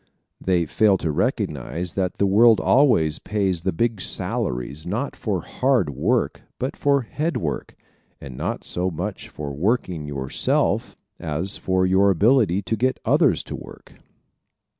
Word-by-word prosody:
They 90 -3 +2
fail 100 +5 +3
to 80 -3 -2
recognize 85 +3 -2
that 95 -2 -2
the 100 - +2
world 110 +3 +5
always 120 - +3
pays 95 -5 -1
the 95 - 0
big 110 +3 -1
salaries 65 0 -3
not 110 +10 -2
for 95 -6 -2
hand 125 - +1
work 95 - 0 0.2
but 130 +2 -3
for 140 -2 +2
head 155 +8 -2
work, 75 -4 -4 0.4
and 65 -3 -9
not - - -3
so 90 +1 -1
much 80 - -5
for 70 -2 -6
working 90 - -1
yourself 70 -2 -1 0.2
as 85 +5 -1
for 95 0 0
your 95 +2 +4
ability 105 0 +3
to 115 - -1
get 130 +4 0
others - - +3
to - - -6
work. - - -12
95 Hz, 145 wpm, -23 LUFS, 80-115 Hz, 0.4 s, world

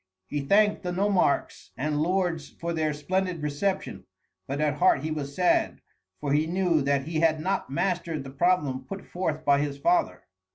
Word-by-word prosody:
He 145 +8 -3
thanked 205 +8 +3
the 180 - -3
nomarchs 190 -4 +1
and 150 +2 -1
lords 175 -3 0
for 170 0 -5
their 155 -2 0
splendid 180 +2 -2
reception, 150 +7 -2 0.4
but 140 +2 -3
at 150 -1 0
heart 175 -6 +4
he 155 - -2
was 140 -2 -4
sad, 180 -1 +2 0.4
for 140 -1 -1
he 155 +2 +2
knew 175 -2 +1
that 140 0 +1
he 160 +2 -2
had 160 -1 +3
not 190 +5 -1
mastered 170 0 -1
the 135 - -9
problem 145 -4 +1
put 195 +7 -7
forth 160 -4 -3
by 140 -1 +4
his 145 -1 -2
father. 140 - +1
155 Hz, 175 wpm, -27 LUFS, 145-180 Hz, 0.4 s, heart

